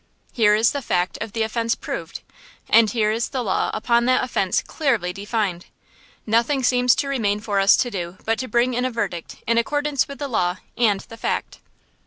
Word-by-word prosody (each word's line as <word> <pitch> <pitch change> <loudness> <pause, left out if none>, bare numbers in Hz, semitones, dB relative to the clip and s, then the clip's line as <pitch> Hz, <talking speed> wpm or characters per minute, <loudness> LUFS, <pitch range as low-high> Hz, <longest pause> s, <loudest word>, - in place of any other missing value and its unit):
Here 210 -3 +4
is 225 +2 +3
the 285 - -3
fact 180 -6 -1
of 220 -2 -5
the 225 - 0
offence 230 +1 -1
proved, - - -6 0.5
and 225 -1 +5
here 215 -2 +1
is 225 +1 -1
the 260 -2 -2
law 195 - 0
upon 235 +2 +1
that 255 +1 +3
offence 215 -4 0
clearly 235 - -1
defined. 200 -3 -3 0.6
Nothing 235 +5 +1
seems 250 0 +4
to 280 - -1
remain 215 -7 0
for 210 -2 -1
us 195 0 +6
to 245 - 0
do 175 -2 -5
but 225 0 0
to 255 - -3
bring 240 +2 +1
in 245 +1 -1
a 255 - +1
verdict 200 -8 -4
in 230 0 +2
accordance 290 +2 0
with 280 - -8
the 285 - -4
law 180 -7 0 0.2
and 210 -5 +2
the 225 -1 -12
fact." - - -3
230 Hz, 200 wpm, -22 LUFS, 205-250 Hz, 0.6 s, us